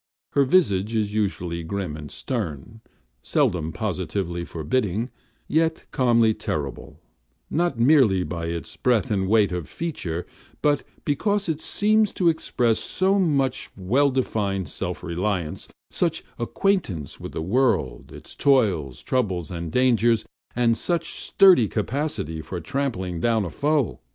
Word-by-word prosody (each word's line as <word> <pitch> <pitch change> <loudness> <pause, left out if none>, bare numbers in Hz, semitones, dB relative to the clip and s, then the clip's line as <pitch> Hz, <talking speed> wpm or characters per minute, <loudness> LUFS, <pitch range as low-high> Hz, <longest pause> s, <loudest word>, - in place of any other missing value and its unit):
Her 140 - +3
visage 115 - +2
is 105 -2 0
usually 90 -5 -1
grim 90 -1 -4
and 75 -1 -8
stern, 110 - -4 0.4
seldom 80 -3 +1
positively 90 -4 -3
forbidding, 105 - -1 0.4
yet 160 +1 +1
calmly 115 -4 +3
terrible, 75 -10 -5 0.5
not 170 -5 0
merely 120 -8 +5
by 85 -2 -4
its 85 0 -5
breadth 120 -5 +1
and 95 -2 0
weight 105 -2 +4
of 90 -3 -4
feature, 90 - -4 0.4
but 145 -1 +3 0.2
because 200 +7 0
it 160 -2 -2
seems 215 0 +2
to 175 -3 +3
express 120 -8 +1
so 190 +2 +1
much 140 -8 +1
well 125 +10 +2
defined 100 - -1
self - - -4
reliance, 85 -1 -2 0.2
such - - 0 0.2
acquaintance 120 - -1
with - - -7
the 80 - -3
world, 100 - 0
its - - -8
toils, 100 - +2
troubles, 95 - -1
and 85 -2 -5
dangers, 120 -2 +3 0.3
and 115 -1 +2
such 170 -2 -1
sturdy 180 - +5
capacity 105 - -2
for 90 +3 -6
trampling 95 - -2
down 115 0 +2
a 85 - -5
foe. 145 - 0
110 Hz, 130 wpm, -24 LUFS, 90-140 Hz, 0.5 s, merely